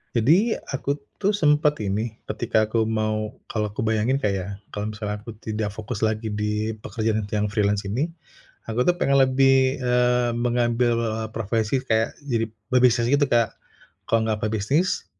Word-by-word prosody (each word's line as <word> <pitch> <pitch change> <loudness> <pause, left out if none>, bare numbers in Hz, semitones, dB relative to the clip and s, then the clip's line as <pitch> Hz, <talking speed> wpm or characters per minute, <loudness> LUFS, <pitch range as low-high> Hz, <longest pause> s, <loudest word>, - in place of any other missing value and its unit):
Jadi, 170 - +4 0.2
aku 140 +1 -1 0.2
tuh 205 +1 +2
sempet 150 -3 +3
ini, 105 +3 -2
ketika 110 -1 0
aku 110 0 +1
mau 110 -1 -1 0.2
kalau 105 -1 -1
aku - - -3
bayangin 110 +3 +1
Kak 105 - +1
ya, 95 -1 -3 0.2
kalau 105 +1 -3
misalnya 105 -1 -4
aku 110 +1 -10
tidak 110 -1 -3
fokus 110 0 -5
lagi 110 0 -2
di 105 +1 -1
pekerjaan 110 -1 -2
tuh 105 - -4
yang - - +1
freelance 105 -2 +1
ini, 115 +11 -1 0.6
aku 115 +2 0
tuh 175 +6 +2
pengen 140 0 +3
lebih, 130 0 +4
eee, 125 -1 +2
mengambil, 120 0 +1
eee, 110 -1 -2
profesi 110 +3 -1
kayak 110 -3 0
jadi 115 -4 -1 0.2
pebisnis 125 -2 +4
gitu 145 0 +4
Kak. 115 -2 +2 0.5
Kalau 115 - +3
nggak 110 -1 -1
pebisnis 110 - 0
115 Hz, 160 wpm, -24 LUFS, 110-125 Hz, 0.6 s, Jadi